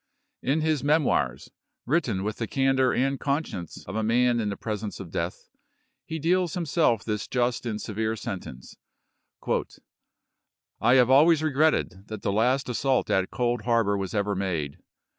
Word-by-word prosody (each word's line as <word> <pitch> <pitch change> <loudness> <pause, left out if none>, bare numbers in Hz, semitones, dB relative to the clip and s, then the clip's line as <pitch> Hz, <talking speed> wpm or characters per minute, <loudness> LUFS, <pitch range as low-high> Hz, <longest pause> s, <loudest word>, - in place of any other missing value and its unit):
In 145 +5 +1
his 155 -3 +1
"Memoii's," 140 - +1 0.3
written 120 - 0
with 105 +1 -3
the 115 - -3
candor 135 0 +2
and 135 +1 0
conscience 140 - -3
of 95 - -7
a 110 - 0
man 120 +2 +2
in 105 -2 -1
the 100 - -4
presence 105 -1 -4
of 90 -4 -8
death, 85 +2 -4 0.6
he 160 - -3
deals 175 +2 +1
himself 155 - +1
this 105 -2 -2
just 120 -1 -1
and 105 -2 -3
severe 110 +1 -2
sentence: 95 - -7 0.4
" - - -28 1.3
I 120 +3 +5
have 125 -1 +5
always 155 +3 +6
regretted 140 - +1
that 110 -2 -7
the - - 0
last 125 +6 +2
assault 130 +1 0
at 95 -1 +1
Cold 120 -1 -1
Harbor 115 -3 +2
was 95 0 -3
ever 100 0 0
made. 90 -7 -3
120 Hz, 160 wpm, -26 LUFS, 100-135 Hz, 1.3 s, always